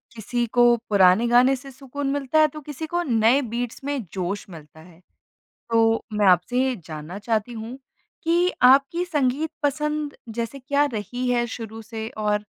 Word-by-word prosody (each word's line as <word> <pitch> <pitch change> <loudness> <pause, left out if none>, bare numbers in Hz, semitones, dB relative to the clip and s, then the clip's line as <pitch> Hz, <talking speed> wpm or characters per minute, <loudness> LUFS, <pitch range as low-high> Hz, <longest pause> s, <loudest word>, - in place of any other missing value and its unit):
किसी 240 +2 -2
को 240 +1 +4
पुराने 200 +3 +5
गाने 250 +3 +5
से 270 +1 -11
सुकून 275 +1 -6
मिलता 285 +2 +1
है 310 - +6
तो 305 - -8
किसी 295 +2 -6
को 345 +2 -1
नए 235 -1 +3
बीट्स 240 0 -5
में 285 0 -2 0.2
जोश 190 +2 -3
मिलता 160 -2 -13
है। 165 0 -17 0.7
तो 225 0 +3
मैं 210 -1 +2
आपसे 180 +8 +2
ये 260 -1 0
जानना 155 +4 -7
चाहती 220 +2 -1
हूँ 230 +2 -7 0.5
कि 345 +2 +3
आपकी 275 +7 +5
संगीत 295 -2 0
पसंद 300 +1 -1 0.2
जैसे 235 +4 -3
क्या 285 +2 +1
रही 245 +4 -3
है 240 -1 +1
शुरू 225 -1 -7
से? 220 0 -6
और 210 -1 -1
245 Hz, 165 wpm, -23 LUFS, 215-280 Hz, 0.7 s, है